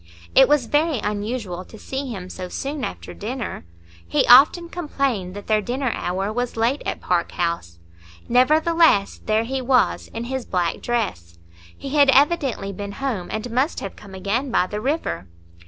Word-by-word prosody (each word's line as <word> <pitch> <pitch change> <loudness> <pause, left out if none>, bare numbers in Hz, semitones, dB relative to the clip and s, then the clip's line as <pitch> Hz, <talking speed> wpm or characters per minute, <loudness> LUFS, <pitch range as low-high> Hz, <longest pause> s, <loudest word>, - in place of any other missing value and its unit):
It 265 0 +7
was 295 -4 +3
very 295 +3 +1
unusual 210 -3 -3
to 220 - -13
see 270 +5 -5
him 185 -5 -6
so 180 -1 -6
soon 275 +5 -4
after - - -6
dinner! 225 - -5 0.4
He 85 - +2
often 300 +7 +7
complained 275 - -2
that 205 - -8
their 215 -1 +2
dinner 250 +4 -2
hour 190 +4 -2
was 245 0 -3
late 240 +6 +1
at - - -3
Park 175 -1 0
House. 170 - -2 0.5
Nevertheless, 305 -2 +3
there 215 +1 +1
he 260 +3 -3
was, 250 -1 +2
in 230 - -6
his 260 +1 -3
black 175 -5 -1
dress; 180 - -2 0.4
he 275 - -7
had 285 0 +4
evidently 270 -8 +2
been 200 +1 -6
home, 225 -8 -3
and 220 +2 -4
must 260 +6 0
have 195 - -6
come 200 -2 -12
again 210 +8 -1
by 205 - +2
the 210 +3 -5
river. 250 - -2
235 Hz, 170 wpm, -22 LUFS, 195-270 Hz, 0.5 s, It